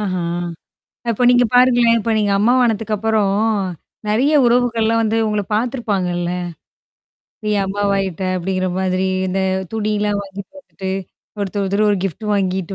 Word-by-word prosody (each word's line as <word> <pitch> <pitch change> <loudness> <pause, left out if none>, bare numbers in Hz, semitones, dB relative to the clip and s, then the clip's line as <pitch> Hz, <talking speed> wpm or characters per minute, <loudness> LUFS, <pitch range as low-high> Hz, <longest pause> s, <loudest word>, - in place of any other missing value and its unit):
ஆஹ. 195 -3 -2 1.0
அப்ப 235 +2 +1
நீங்க 245 0 +4
பாருங்களேன். 245 -2 +5
இப்ப 225 +1 -1
நீங்க 205 -1 +1
அம்மா 235 +4 +4
வானதுக்கப்புறம் 215 -3 +1 0.7
நெறைய 250 +8 +2
உறவுகள்லாம் 230 -2 +2
வந்து 220 +1 +1
உங்கள 210 -1 0
பார்த்துருப்பாங்கல்ல? 200 -7 -1 1.1
நீ 210 - 0
அம்மா 200 +1 -3
வாயிட்ட 195 -3 -2
அப்படிங்கிற 185 +1 -1
மாதிரி 185 0 0 0.2
இந்த 190 +1 -1 0.3
துணியெல்லாம் 210 -1 0
வாங்கி 195 0 -8
போட்டுட்டு. 195 -9 -7 0.5
ஒருத்தர் 200 0 -2
ஒருத்தர் 200 +2 +1
ஒரு 205 - +2
கிஃப்ட் 195 +4 -4
வாங்கிட்டு 190 -1 -1
210 Hz, 125 wpm, -19 LUFS, 195-230 Hz, 1.1 s, பாருங்களேன்